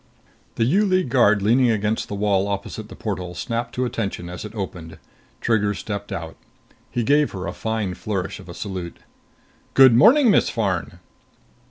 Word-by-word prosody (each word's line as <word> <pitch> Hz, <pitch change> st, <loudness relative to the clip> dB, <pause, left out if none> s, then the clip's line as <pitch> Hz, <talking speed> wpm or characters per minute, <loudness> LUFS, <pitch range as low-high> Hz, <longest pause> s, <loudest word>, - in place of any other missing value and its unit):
The 115 Hz, -, +1 dB
U 185 Hz, -, +3 dB
League 185 Hz, -6 st, +1 dB
guard 110 Hz, -5 st, +4 dB
leaning 120 Hz, +4 st, +4 dB
against 110 Hz, 0 st, 0 dB
the 100 Hz, -, -5 dB
wall 100 Hz, -1 st, +1 dB
opposite 100 Hz, +2 st, -5 dB
the -, -, -10 dB
portal 90 Hz, -4 st, -4 dB
snapped 115 Hz, +5 st, -3 dB
to 125 Hz, -, 0 dB
attention 100 Hz, -7 st, -4 dB
as 90 Hz, -, -7 dB
it 105 Hz, +1 st, -9 dB
opened. 90 Hz, -5 st, -6 dB, 0.4 s
Trigger 105 Hz, -3 st, +1 dB
stepped 100 Hz, 0 st, -5 dB
out. 80 Hz, -1 st, -6 dB, 0.5 s
He 120 Hz, -, -1 dB
gave 145 Hz, +4 st, +2 dB
her 95 Hz, -1 st, -5 dB
a -, -, -4 dB
fine 110 Hz, -4 st, -2 dB
flourish 95 Hz, -1 st, -4 dB
of -, -, -13 dB
a -, -, -8 dB
salute. 90 Hz, -4 st, -6 dB, 0.8 s
"Good 135 Hz, -3 st, +8 dB
morning, 240 Hz, -, +6 dB
Miss -, -, +3 dB
Farn." 100 Hz, -7 st, -2 dB
105 Hz, 170 wpm, -22 LUFS, 95-120 Hz, 0.8 s, Good